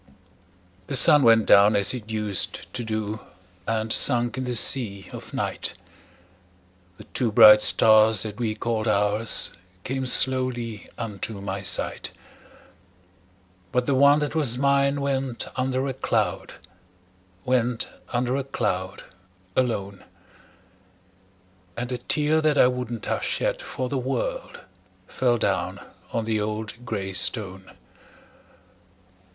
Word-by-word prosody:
The 140 - -4
sun 145 +3 +7
went 115 -3 +4
down 100 +2 +5
as 100 +2 +3
it 115 -4 -8
used 105 -3 -3
to 125 -1 -3
do, 110 -1 -4 0.5
And 110 0 -2
sunk 120 -2 +4
in 130 -1 -5
the 125 -1 -3
sea 100 -6 +3
of - - -10
night; - - -4 1.2
The - - -13
two 120 -4 -2
bright 105 -1 +7
stars 110 -1 +5
that 105 0 -8
we 110 -3 -2
called 115 0 -3
ours 105 +1 +3 0.3
Came 130 0 -4
slowly 125 -4 +1
unto 105 -2 -6
my 100 0 -5
sight; 95 - 0 1.6
But 125 0 -1
the 140 - 0
one 140 +2 +4
that 150 -1 -3
was 140 -7 +3
mine 140 +1 +1
went 135 -3 -3
under 130 +1 -2
a 135 - -3
cloud 130 - -3 0.9
Went 125 -2 -1 0.2
under 125 +1 -1
a 140 - -2
cloud, 95 -8 -4 0.5
alone; 100 -6 -3 1.7
And 125 +2 -5
a 125 - -4
tear 155 +1 0
that 155 -2 +1
I - - +6
wouldn't 125 -3 -4
have - - -3
shed - - -2
for 130 - -5
the 135 +1 -3
world, - - -5 0.4
Fell 125 -2 -1
down - - -2 0.3
on 115 -1 -3
the 110 -1 -2
old 110 +2 -6
gray 95 -3 -5
stone. 95 -2 -3
120 Hz, 125 wpm, -23 LUFS, 110-130 Hz, 1.7 s, sun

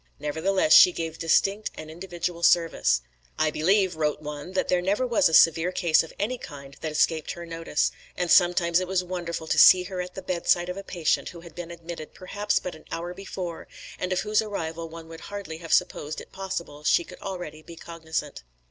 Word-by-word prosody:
Nevertheless 160 +3 +1
she 180 - +9
gave 165 -2 -5
distinct 195 +6 +2
and 155 0 -8
individual 175 0 -5
service. 165 - +3 0.4
"I 155 -1 +2
believe," 185 +3 +2
wrote 150 -1 0
one, 150 +3 -7
"that 190 - 0
there 180 -1 +2
never 200 +8 +1
was 235 -8 +3
a - - -6
severe 165 +2 +5
case 170 -4 +3
of 165 - -8
any 240 +5 -2
kind 140 -5 -10
that 155 - -3
escaped 155 +1 +1
her 170 0 -8
notice; 165 -2 -1 0.3
and 175 -1 -1
sometimes 175 -1 +4
it 185 - -3
was 185 -1 0
wonderful 175 -2 -4
to - - +1
see 180 -1 +8
her 185 0 -4
at 180 0 -8
the 190 - -7
bedside 175 0 +1
of 180 - -4
a 195 - -6
patient 175 -5 0
who 170 - -11
had 170 -2 -13
been 175 0 -7
admitted 170 -2 -8
perhaps 205 +3 -1
but 180 - -3
an 155 - -14
hour 175 +1 -4
before, 185 -3 -6 0.3
and 180 - -3
of 185 - +1
whose 210 0 +2
arrival 165 -6 -5
one 165 0 -10
would 165 0 -11
hardly 195 -6 -6
have 165 -1 -8
supposed 150 +1 +1
it - - -12
possible 170 -6 -6
she 170 - +3
could 180 - -13
already 175 -6 -6
be 170 +1 -12
cognisant." 160 -3 -5
170 Hz, 205 wpm, -26 LUFS, 160-185 Hz, 0.4 s, she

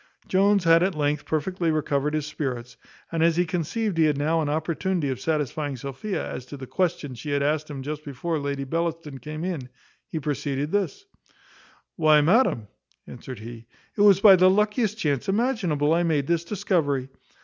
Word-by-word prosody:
Jones 200 0 +3
had 165 0 +5
at 185 -1 +1
length 145 0 0
perfectly 170 +2 -1
recovered 150 -1 0
his 155 -2 -1
spirits; 125 -5 -4 0.4
and 165 -1 -1
as 165 0 +4
he 175 - +3
conceived 175 +4 -2
he 160 - +5
had 150 -2 +2
now 160 +3 +1
an 150 - -1
opportunity 160 +1 -1
of 130 -2 -3
satisfying 150 -1 -2
Sophia 140 - -4
as - - -6
to 145 - -8
the 130 - -7
question 165 -3 -1
she 135 +5 -7
had 140 0 +1
asked 155 +1 0
him 135 -3 -6
just 150 +2 -5
before 150 +4 -3
Lady 140 -1 -3
Bellaston 165 -1 -3
came 155 +5 -6
in, 165 -9 -4 0.4
he 160 - -4
proceeded 145 0 -2
thus: 205 - -1 0.9
"Why, 155 -3 +5
madam," 165 - +3 0.4
answered 125 +1 -9
he, 115 0 -10 0.3
"it 205 - 0
was 200 -2 +6
by 200 -2 +9
the 185 +1 +6
luckiest 210 +2 +1
chance 145 - -1
imaginable 195 - +1
I 170 - +3
made 155 -5 +1
this 170 +2 0
discovery. 145 -9 0
155 Hz, 180 wpm, -25 LUFS, 140-180 Hz, 0.9 s, by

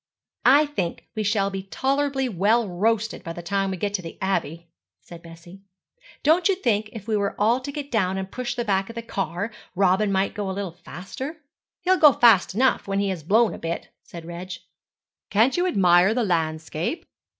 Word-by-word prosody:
'I 280 +5 +6
think 195 - -4
we 215 - -3
shall 200 -1 +1
be 195 0 -4
tolerably 270 +6 -1
well 220 +2 +2
roasted 220 +5 -1
by 165 - -5
the 175 - -8
time 195 +2 0
we 190 - -3
get 200 +3 -2
to 195 - -1
the 165 -2 -9
Abbey,' 170 -3 -2 0.3
said 170 -1 -13
Bessie. 170 +3 -13 0.6
'Don't 335 +6 +4
you 390 - +3
think 215 - 0
if 220 -2 -9
we 220 - +1
were 200 -1 -1
all 225 +4 +3
to 285 +2 -6
get 285 0 -6
down 190 -4 +1
and 190 0 -5
push 250 -1 -4
the 240 -2 -2
back 195 -1 0
of 230 - -9
the 230 - -5
car, 195 0 -3 0.2
Robin 195 +2 +2
might 195 0 +1
go 205 -2 -3
a 190 - -4
little 200 -3 -3
faster?' 200 - -8 0.4
'He'll 370 +1 +3
go 300 -5 +7
fast 225 -6 +4
enough 260 -1 +2
when 195 0 -1
he 200 0 0
has 185 -4 -3
blown 215 +8 +3
a - - -8
bit,' 165 +1 -4
said 170 -1 -11
Reg. 175 +2 -7 0.8
'Can't 225 +6 +3
you 355 +1 +1
admire 185 - +4
the 245 - +1
landscape?' 160 - -2
200 Hz, 200 wpm, -24 LUFS, 180-240 Hz, 0.8 s, go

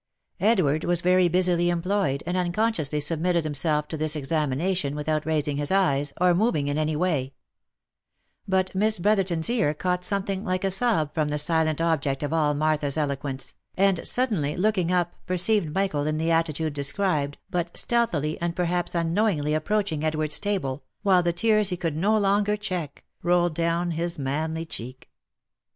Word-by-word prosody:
Edward 175 -9 +2
was 175 -1 0
very 180 0 +4
busily 175 0 +2
employed, 175 -5 0
and 175 +2 -2
unconsciously 175 -4 0
submitted 165 +3 +1
himself 150 0 0
to 160 - -5
this 155 0 0
examination 150 +2 -1
without 155 +1 -2
raising 150 -2 0
his 145 0 0
eyes, 145 -7 +2
or 180 0 +4
moving 175 -7 +1
in 145 - -1
any 155 0 0
way; 150 -6 -1 1.1
but 190 -1 0
Miss 215 +3 +2
Brotherton's 185 -4 +2
ear 220 -11 +1
caught 180 +3 -1
something 200 0 -1
like 185 -1 -2
a 195 - +1
sob 190 -8 +1
from 155 -2 0
the 150 0 -2
silent 155 0 +2
object 150 -4 0
of 145 - -2
all 150 -2 +2
Martha's 150 -1 0
eloquence, 140 -2 -3 0.2
and 195 -2 +2
suddenly 200 - +1
looking 185 -3 +1
up 175 -1 +1
perceived 185 -1 +1
Michael 155 -5 -1
in 155 0 -1
the 165 +1 0
attitude 160 -1 0
described, 145 0 -1
but 175 -1 -3
stealthily, 170 -12 0
and 170 0 -2
perhaps 175 0 -1
unknowingly 170 -3 +1
approaching 160 -1 -1
Edward's 155 -1 +1
table, 145 -10 -2 0.2
while 190 -3 +4
the 175 0 +1
tears 215 +3 +2
he 180 - -3
could 165 -3 -2
no 205 +7 +2
longer 205 +1 +1
check, 180 -8 -5 0.2
roiled 175 -1 +2
down 170 +2 0
his 170 +1 -3
manly 155 +4 -2
cheek. 130 -3 -9
170 Hz, 160 wpm, -25 LUFS, 150-185 Hz, 1.1 s, very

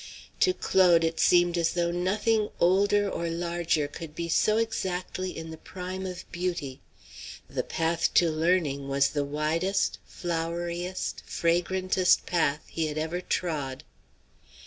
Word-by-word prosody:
To 370 - +5
Claude 175 -3 +4
it 165 0 -1
seemed 175 -1 +4
as 170 0 +1
though 170 -1 0
nothing 210 +5 +1
older 205 +3 +3
or 170 -3 -2
larger 170 -2 0
could 155 +1 -9
be 170 +1 -4
so 215 +6 +3
exactly 185 -4 -2
in 160 0 -6
the 160 - -9
prime 185 +1 -6
of 180 -1 -6
beauty; 170 -7 -3 0.7
the - - -2
path 165 +1 0
to 170 -2 +5
learning 155 -4 +1
was 140 0 +2
the 145 -1 -1
widest, 155 +7 0
floweriest, 175 +1 -3
fragrantest 185 +2 +2
path 160 -3 +1
he 160 -1 -2
had 150 0 -5
ever 160 +3 -2
trod. 145 -8 -2
170 Hz, 135 wpm, -27 LUFS, 160-185 Hz, 0.7 s, To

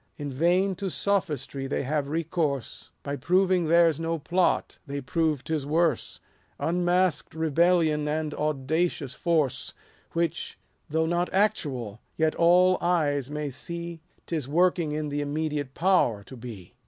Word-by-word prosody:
In 145 -2 -5
vain 180 +7 +2
to 195 +1 -2
sophistry 155 -9 -1
they 140 - -1
have 145 +1 -1
recourse: 155 -4 -2
By 140 0 -3
proving 180 +4 +2
theirs 165 -1 +4
no 165 0 -1
plot, 175 +4 0
they 140 0 -3
prove 155 0 0
'tis 155 -3 -2
worse 155 -1 0 0.2
— - - -38
220 - - -1
Unmask'd 175 -3 +1
rebellion, 160 -1 +2
and 155 0 -1
audacious 150 0 -1
force: 160 -5 0 0.4
Which, 170 -1 -2 0.3
though 160 +2 +1
not 175 +2 0
actual, 130 - 0 0.2
yet 160 -1 +2
all 180 +2 +4
eyes 145 -6 +1
may 150 -1 -3
see 170 +4 -6 0.2
'Tis 155 -6 -3
working 170 +1 +2
in 150 0 -2
the 145 0 -2
immediate 145 -2 -2
power 165 - +2
to 130 - -11
be. 115 -7 -10
160 Hz, 140 wpm, -27 LUFS, 145-170 Hz, 0.4 s, theirs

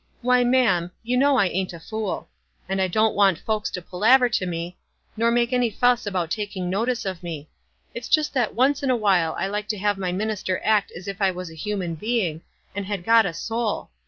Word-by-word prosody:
" - - -38
Why, 250 0 +4
ma'am, 240 -9 +2 0.2
}^ou 245 +2 0
know 275 +1 +4
I 200 - +4
ain't 185 0 -2
a 170 - -9
fool. 215 +3 -4 0.4
I 190 0 0
don't 215 +4 +2
want 195 -4 +4
folks 215 -1 -2
to 180 - -6
palaver 240 +8 +4
to 195 -5 -1
mo, 170 0 -4 0.4
nor 230 +1 +2
make 240 +1 +1
any 245 -2 +2
fuss 245 +1 +2
about 180 -4 -2
taking 200 -4 -3
notice 235 +4 -1
of 185 -3 -4
me. 160 -4 -7 0.4
It's 235 0 -7
just 310 -2 +2
that 245 -6 0
once 265 +4 +2
in 275 - -1
a 255 - +4
while 190 -7 +2
I - - -1
like 210 +1 -3
to 215 0 -2
have 205 0 0
my 185 -2 -1
minister 195 -1 -2
act 215 -2 +2
as 180 - -10
if 195 0 -6
I 195 - +4
was 180 -2 -6
a - - -11
human 180 +1 -3
being, 180 -3 -1 0.3
and 200 -1 -4
had 200 -3 -3
got 225 -2 +5
a 170 - -4
soul. 225 - -3
205 Hz, 220 wpm, -23 LUFS, 185-235 Hz, 0.4 s, got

